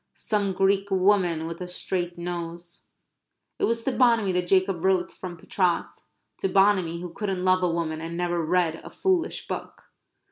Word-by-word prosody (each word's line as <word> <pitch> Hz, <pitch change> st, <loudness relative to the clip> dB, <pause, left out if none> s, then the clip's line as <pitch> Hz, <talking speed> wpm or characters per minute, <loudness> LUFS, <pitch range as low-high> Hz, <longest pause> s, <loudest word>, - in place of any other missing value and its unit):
"Some 205 Hz, -3 st, -1 dB
Greek 195 Hz, +1 st, +2 dB
woman 185 Hz, -4 st, +2 dB
with 165 Hz, +2 st, -6 dB
a 180 Hz, -, -4 dB
straight 180 Hz, -1 st, -2 dB
nose." 170 Hz, 0 st, -6 dB, 0.7 s
It -, -, +3 dB
was 230 Hz, 0 st, -1 dB
to 270 Hz, -, 0 dB
Bonamy 230 Hz, -6 st, +3 dB
that 180 Hz, -1 st, -1 dB
Jacob 185 Hz, -2 st, +2 dB
wrote 190 Hz, -2 st, +2 dB
from 180 Hz, -2 st, -8 dB
Patras 180 Hz, +1 st, -1 dB, 0.3 s
to 195 Hz, -, 0 dB
Bonamy 185 Hz, -4 st, +3 dB
who 175 Hz, -1 st, -7 dB
couldn't 190 Hz, -2 st, -2 dB
love 185 Hz, 0 st, +4 dB
a 180 Hz, -, +2 dB
woman 165 Hz, -2 st, -2 dB
and 165 Hz, +1 st, -5 dB
never 175 Hz, -1 st, 0 dB
read 165 Hz, -1 st, +1 dB
a -, -, -9 dB
foolish 375 Hz, -3 st, -1 dB
book. -, -, -7 dB
180 Hz, 170 wpm, -26 LUFS, 170-195 Hz, 0.7 s, love